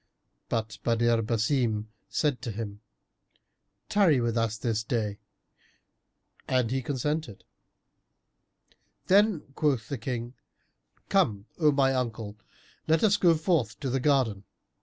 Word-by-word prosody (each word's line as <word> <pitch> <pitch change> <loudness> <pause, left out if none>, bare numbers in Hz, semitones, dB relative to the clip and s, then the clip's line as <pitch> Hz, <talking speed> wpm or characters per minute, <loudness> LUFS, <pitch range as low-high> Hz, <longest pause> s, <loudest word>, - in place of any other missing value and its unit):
But 110 -2 -2
Badr 115 0 +2
Basim 110 -1 0 0.2
said 145 -6 0
to 120 - -4
him, 105 -1 -6 1.1
"Tarry 180 -10 +4
with 120 -1 0
us 115 -1 0
this 110 -1 -1
day;" 110 -3 -2 1.3
and 125 -3 +1
he 135 0 0
consented. 145 -2 -3 1.6
Then 200 -3 +4
quoth 135 -7 0
the 140 - -3
King, 120 0 -4 0.8
"Come, 115 - +2
O 155 -3 +5
my 135 -1 +3
uncle, 115 -5 -3 0.5
let 160 0 +3
us 205 -2 +5
go 175 -4 +4
forth 155 - 0
to 135 - -2
the 135 - +1
garden." 125 -8 +1
125 Hz, 115 wpm, -28 LUFS, 110-150 Hz, 1.6 s, O